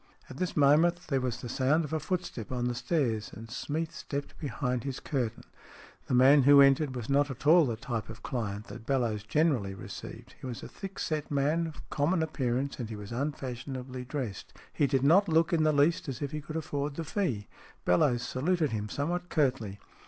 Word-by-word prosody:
At 130 Hz, -, -9 dB
this 180 Hz, 0 st, -2 dB
moment 155 Hz, +5 st, +5 dB
there 135 Hz, -3 st, +1 dB
was 125 Hz, -3 st, -2 dB
the -, -, -5 dB
sound 140 Hz, +7 st, +2 dB
of 150 Hz, -, -7 dB
a 160 Hz, -, +1 dB
footstep 170 Hz, -, -4 dB
on 125 Hz, -1 st, -1 dB
the 125 Hz, -, 0 dB
stairs, 120 Hz, -4 st, 0 dB
and 115 Hz, +1 st, -10 dB
Smeath 160 Hz, +6 st, -3 dB
stepped 140 Hz, -2 st, -5 dB
behind 125 Hz, -4 st, -2 dB
his 135 Hz, -2 st, -4 dB
curtain. 120 Hz, -6 st, -2 dB, 0.6 s
The 125 Hz, -, +1 dB
man 135 Hz, +3 st, +7 dB
who 140 Hz, +2 st, +7 dB
entered 140 Hz, 0 st, +5 dB
was 120 Hz, -2 st, -4 dB
not 140 Hz, +1 st, +3 dB
at 135 Hz, +1 st, -8 dB
all 160 Hz, 0 st, +7 dB
the 115 Hz, -, -1 dB
type 115 Hz, -1 st, -4 dB
of 115 Hz, 0 st, -10 dB
client 105 Hz, -4 st, -3 dB
that 115 Hz, -1 st, -10 dB
Bellowes 120 Hz, -6 st, +1 dB
generally 115 Hz, -4 st, +1 dB
received. -, -, -9 dB
He -, -, -5 dB
was 120 Hz, -2 st, -6 dB
a -, -, -6 dB
thick 195 Hz, -1 st, -8 dB
set 155 Hz, -2 st, -2 dB
man 150 Hz, +4 st, +1 dB
of 160 Hz, -, -10 dB
common 160 Hz, +4 st, +2 dB
appearance, 135 Hz, -3 st, -1 dB
and 115 Hz, -3 st, -4 dB
he 110 Hz, -, -5 dB
was 105 Hz, 0 st, -8 dB
unfashionably 130 Hz, -1 st, -4 dB
dressed. 125 Hz, -6 st, -5 dB, 0.2 s
He 145 Hz, -, +2 dB
did 135 Hz, 0 st, +1 dB
not 180 Hz, +7 st, +5 dB
look 165 Hz, +1 st, +3 dB
in 165 Hz, -, +3 dB
the 155 Hz, 0 st, +4 dB
least 150 Hz, +1 st, +2 dB
as 130 Hz, -, -4 dB
if 145 Hz, -1 st, -3 dB
he 150 Hz, -1 st, -4 dB
could 155 Hz, +1 st, -8 dB
afford 145 Hz, -2 st, -3 dB
the 165 Hz, -, -3 dB
fee. 150 Hz, -, -2 dB, 0.4 s
Bellowes 120 Hz, +7 st, +3 dB
saluted 155 Hz, +5 st, 0 dB
him 105 Hz, -1 st, -3 dB
somewhat 175 Hz, +7 st, -2 dB
curtly. 125 Hz, -, 0 dB
140 Hz, 205 wpm, -30 LUFS, 120-155 Hz, 0.6 s, man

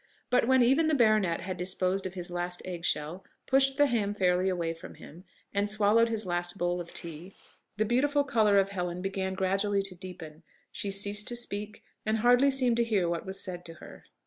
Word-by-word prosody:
But 250 Hz, -2 st, +3 dB
when 260 Hz, -1 st, +5 dB
even 275 Hz, +7 st, +3 dB
the 315 Hz, -, +2 dB
baronet 215 Hz, -9 st, +3 dB
had 185 Hz, 0 st, -5 dB
disposed 185 Hz, +2 st, -1 dB
of 185 Hz, -, -10 dB
his 175 Hz, -1 st, -3 dB
last 175 Hz, 0 st, -2 dB
egg 175 Hz, -2 st, -6 dB
shell, 155 Hz, +6 st, -1 dB, 0.2 s
pushed 270 Hz, 0 st, +3 dB
the 290 Hz, -, +5 dB
ham 215 Hz, -6 st, 0 dB
fairly 185 Hz, -1 st, +2 dB
away 170 Hz, -3 st, -1 dB
from 165 Hz, +2 st, -11 dB
him, 175 Hz, +5 st, -13 dB, 0.3 s
and 200 Hz, +1 st, 0 dB
swallowed 215 Hz, +2 st, +3 dB
his 220 Hz, -2 st, 0 dB
last 175 Hz, +1 st, -2 dB
bowl 175 Hz, -1 st, -1 dB
of 170 Hz, -, -10 dB
tea, 170 Hz, +3 st, -7 dB, 0.4 s
the 215 Hz, -, +1 dB
beautiful 285 Hz, +6 st, +2 dB
colour 215 Hz, -6 st, +3 dB
of 195 Hz, 0 st, +3 dB
Helen 180 Hz, -2 st, -4 dB
began 190 Hz, -1 st, -2 dB
gradually 195 Hz, +1 st, 0 dB
to 195 Hz, -1 st, -2 dB
deepen; 175 Hz, -4 st, -10 dB, 0.3 s
she 205 Hz, -1 st, -4 dB
ceased 205 Hz, +1 st, 0 dB
to 240 Hz, -, -2 dB
speak, 210 Hz, -3 st, -6 dB, 0.2 s
and 220 Hz, +1 st, 0 dB
hardly 245 Hz, +4 st, +5 dB
seemed 255 Hz, -3 st, +2 dB
to 235 Hz, -, +3 dB
hear 210 Hz, -6 st, +1 dB
what 170 Hz, +2 st, -3 dB
was 190 Hz, +1 st, -4 dB
said 180 Hz, -1 st, -6 dB
to 165 Hz, -, -9 dB
her. -, -, -13 dB
195 Hz, 205 wpm, -29 LUFS, 180-225 Hz, 0.4 s, when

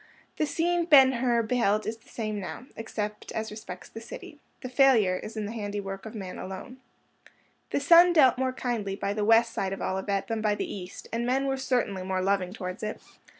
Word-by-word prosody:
The 310 Hz, -, +1 dB
scene 345 Hz, +2 st, +1 dB
Ben 275 Hz, -5 st, +7 dB
Hur 240 Hz, -2 st, +1 dB
beheld 215 Hz, -2 st, +1 dB
is 225 Hz, +1 st, -3 dB
the 225 Hz, -, -23 dB
same 215 Hz, -2 st, -3 dB
now, 200 Hz, +5 st, -7 dB
except 210 Hz, -2 st, -5 dB
as 220 Hz, 0 st, -3 dB
respects 185 Hz, -4 st, -8 dB
the 225 Hz, -, -9 dB
city. 290 Hz, +5 st, -10 dB, 0.2 s
The -, -, -5 dB
failure 245 Hz, -8 st, +4 dB
is 220 Hz, +4 st, -8 dB
in 215 Hz, -, -2 dB
the 205 Hz, -, -5 dB
handiwork 205 Hz, -2 st, -5 dB
of 220 Hz, -, -9 dB
man 190 Hz, -4 st, -6 dB
alone. 190 Hz, +7 st, -7 dB, 0.9 s
The -, -, 0 dB
sun 340 Hz, +5 st, +7 dB
dealt 265 Hz, -7 st, +5 dB
more 260 Hz, 0 st, +1 dB
kindly 230 Hz, -6 st, -3 dB
by 200 Hz, 0 st, -2 dB
the 210 Hz, 0 st, -1 dB
west 230 Hz, +2 st, +4 dB
side 195 Hz, 0 st, -2 dB
of 195 Hz, -, -6 dB
Olivet 195 Hz, +1 st, -1 dB
than 225 Hz, -1 st, -2 dB
by 210 Hz, -1 st, +2 dB
the -, -, -2 dB
east, 185 Hz, -2 st, -8 dB
and 230 Hz, +1 st, 0 dB
men 260 Hz, +3 st, +1 dB
were 270 Hz, 0 st, 0 dB
certainly 245 Hz, -7 st, -1 dB
more 185 Hz, 0 st, -2 dB
loving 195 Hz, -2 st, +1 dB
towards 185 Hz, -2 st, -6 dB
it. 215 Hz, 0 st, -4 dB
220 Hz, 205 wpm, -27 LUFS, 200-255 Hz, 0.9 s, Ben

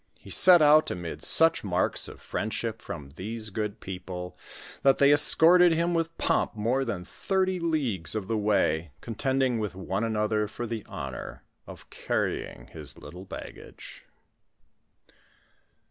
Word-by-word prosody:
He -, -, -14 dB
set 175 Hz, -3 st, +7 dB
out 150 Hz, +1 st, +5 dB
amid 85 Hz, -4 st, -6 dB
such 165 Hz, -, +5 dB
marks 95 Hz, -2 st, 0 dB
of -, -, -12 dB
friendship 110 Hz, +1 st, -4 dB
from 70 Hz, -4 st, -9 dB
these 110 Hz, +2 st, -6 dB
good 105 Hz, +1 st, -4 dB
people, 90 Hz, -1 st, -8 dB, 0.5 s
that 135 Hz, -1 st, +3 dB
they 140 Hz, +1 st, +5 dB
escorted 170 Hz, +4 st, +6 dB
him 170 Hz, +2 st, 0 dB
with 165 Hz, 0 st, -2 dB
pomp -, -, 0 dB
more 120 Hz, +5 st, 0 dB
than 100 Hz, -8 st, -5 dB
thirty 190 Hz, -, -2 dB
leagues 130 Hz, -, -1 dB
of 105 Hz, -3 st, -4 dB
the 115 Hz, -, -1 dB
way, 100 Hz, -6 st, 0 dB
contending 130 Hz, +1 st, -1 dB
with 105 Hz, -4 st, -4 dB
one 95 Hz, +2 st, -3 dB
another 105 Hz, -1 st, -1 dB
for 120 Hz, +3 st, -7 dB
the 115 Hz, -2 st, -5 dB
honor 65 Hz, -2 st, -8 dB, 0.2 s
of -, -, -13 dB
carrying -, -, -3 dB
his -, -, -10 dB
little 90 Hz, +2 st, -11 dB
baggage. -, -, -11 dB
110 Hz, 140 wpm, -26 LUFS, 95-145 Hz, 0.5 s, set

